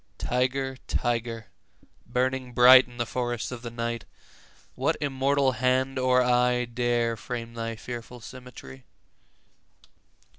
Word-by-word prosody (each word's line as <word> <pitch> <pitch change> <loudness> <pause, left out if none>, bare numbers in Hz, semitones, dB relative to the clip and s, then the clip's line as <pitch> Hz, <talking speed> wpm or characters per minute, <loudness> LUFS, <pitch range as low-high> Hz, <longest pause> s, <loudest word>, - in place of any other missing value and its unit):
20 - - -6
Tiger, 130 +1 0
tiger, 115 -2 -2 0.6
burning 125 +1 -1
bright 125 +2 +8
In 120 -1 -15
the 120 - -1
forests 120 -1 -3
of 125 -2 -7
the 120 - -6
night, 115 -1 -4 0.7
What - - 0
immortal 140 -1 +1
hand 130 +2 0
or 130 0 +3
eye 125 0 +2
Dare 120 -1 0
frame 115 +1 -6
thy 115 0 -4
fearful 120 +1 -8
symmetry? 115 - -11
125 Hz, 120 wpm, -26 LUFS, 115-130 Hz, 0.7 s, bright